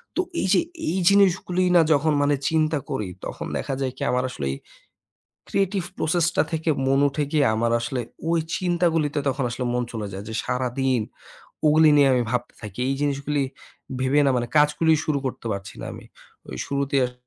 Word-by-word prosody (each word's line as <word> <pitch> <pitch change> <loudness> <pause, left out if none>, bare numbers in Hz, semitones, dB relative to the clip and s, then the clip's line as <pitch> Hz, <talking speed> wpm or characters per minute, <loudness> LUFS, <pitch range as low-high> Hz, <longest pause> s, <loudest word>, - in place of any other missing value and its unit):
তো - - +2 0.2
এইযে, 190 - +3 0.3
এই 190 - -1
জিনিসগুলি 185 -2 +3
না 170 - +8
যখন 150 +2 +2
মানে 145 0 +3
চিন্তা 155 -1 +1
করি 100 -3 -2 0.2
তখন - - -5
দেখা - - -3
যায় 130 -1 -1
কি? - - -12
আমার 125 0 +1
আসলে 70 - -5
এই - - -6 0.9
creative 195 -2 0
process 165 +1 +1
টা - - +4
থেকে 160 0 -1 0.2
মন 135 +1 +3
উঠে 145 +2 -2
গিয়ে 150 -3 +3
আমার 115 +1 +1
আসলে 130 -3 -2 0.3
ওই 170 0 +3 0.2
চিন্তাগুলিতে 165 -4 +1
তখন 135 0 -2
আসলে 125 +1 -3
মন 125 0 0
চলে 110 -2 -4
যায়। 95 +1 -6
যে - - -5
সারাদিন 125 0 0 0.7
ওগুলি 155 +1 +6
নিয়ে 140 -1 +6
আমি 125 - +2
ভাবতে 125 0 -2
থাকি। 105 +2 -7
এই 135 - +1
জিনিসগুলি 145 0 0 0.6
ভেবে 130 +3 +3
না 135 - +4
মানে 120 - -1
কাজগুলি 150 +2 +4
শুরু 150 -2 0
করতে 125 - -5
পারছি 100 -1 -6
না - - -6
আমি। - - -11 0.4
ওই - - -7
শুরুতে 140 0 -1
আস 125 - -10
145 Hz, 185 wpm, -24 LUFS, 125-160 Hz, 0.9 s, না